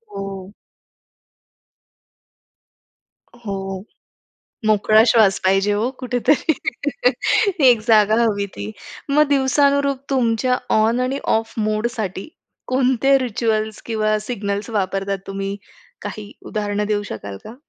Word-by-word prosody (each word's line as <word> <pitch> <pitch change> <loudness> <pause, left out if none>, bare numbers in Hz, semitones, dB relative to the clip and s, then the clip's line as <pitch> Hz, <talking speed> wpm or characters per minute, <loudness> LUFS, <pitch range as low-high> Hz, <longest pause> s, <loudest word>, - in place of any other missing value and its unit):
हो 195 -1 -6 2.9
हो. 195 -1 -4 0.8
मोकळा 215 +1 +5
श्वास 220 -4 +4
पाहिजे 195 +2 +3
हो 220 +5 0
कुठेतरी. 255 +5 +1 1.2
एक 235 -3 +5
जागा 215 -2 +5
हवी 205 -3 0
ती. 100 +1 -5 0.4
मग 300 +2 +4
दिवसानुरूप 280 0 +2
तुमच्या 250 -1 +1 0.2
ऑन 225 +3 +2
आणि 260 +2 -1 0.2
ऑफ 225 0 -4
मोडसाठी 215 -2 -3 0.4
कोणते 260 +1 +3
रिच्युअल्स 220 -3 -2
किंवा 215 -2 0
सिग्नल्स 210 -1 -4
वापरता 195 -1 -1
तुम्ही? 195 0 -4 0.5
काही 210 -1 -7
उदाहरणं 210 -1 -2
देऊ 210 -1 0
शकाल 100 -2 -7
का? 225 - -9
215 Hz, 100 wpm, -20 LUFS, 200-245 Hz, 2.9 s, मोकळा